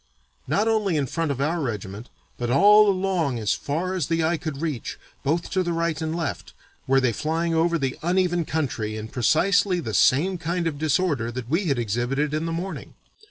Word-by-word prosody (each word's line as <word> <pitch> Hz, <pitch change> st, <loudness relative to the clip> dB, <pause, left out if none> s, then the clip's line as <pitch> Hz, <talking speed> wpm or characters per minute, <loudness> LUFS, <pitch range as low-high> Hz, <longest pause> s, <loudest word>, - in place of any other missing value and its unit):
Not 200 Hz, +11 st, +1 dB
only 210 Hz, -7 st, +1 dB
in 145 Hz, -, +1 dB
front 165 Hz, +3 st, -2 dB
of 140 Hz, -2 st, -2 dB
our 160 Hz, +4 st, 0 dB
regiment, 105 Hz, -3 st, -5 dB, 0.3 s
but 120 Hz, -1 st, -3 dB
all 205 Hz, -, +6 dB
along 185 Hz, -8 st, 0 dB
as 110 Hz, -3 st, 0 dB
far 170 Hz, +6 st, -2 dB
as 180 Hz, -7 st, -1 dB
the 165 Hz, 0 st, 0 dB
eye 165 Hz, +2 st, +2 dB
could 155 Hz, -4 st, -5 dB
reach, 150 Hz, -7 st, -4 dB, 0.2 s
both 165 Hz, +5 st, -1 dB
to 190 Hz, -, +1 dB
the 175 Hz, -1 st, -1 dB
right 165 Hz, -2 st, -1 dB
and 160 Hz, 0 st, -2 dB
left, 165 Hz, -4 st, -4 dB, 0.3 s
were 135 Hz, 0 st, +4 dB
they 130 Hz, -3 st, +1 dB
flying 165 Hz, +7 st, -1 dB
over 170 Hz, +1 st, +2 dB
the 135 Hz, -4 st, -2 dB
uneven 175 Hz, 0 st, +1 dB
country 120 Hz, -9 st, -2 dB
in 110 Hz, 0 st, -6 dB
precisely 180 Hz, -, +2 dB
the 110 Hz, -10 st, -5 dB
same 170 Hz, -, +3 dB
kind 170 Hz, +1 st, -2 dB
of 150 Hz, -3 st, -2 dB
disorder 150 Hz, -6 st, 0 dB
that 120 Hz, -1 st, -6 dB
we 180 Hz, +5 st, +1 dB
had 140 Hz, -6 st, +1 dB
exhibited 120 Hz, +6 st, -1 dB
in 155 Hz, +2 st, -1 dB
the -, -, -2 dB
morning. 180 Hz, +4 st, -5 dB
160 Hz, 200 wpm, -24 LUFS, 135-175 Hz, 0.3 s, all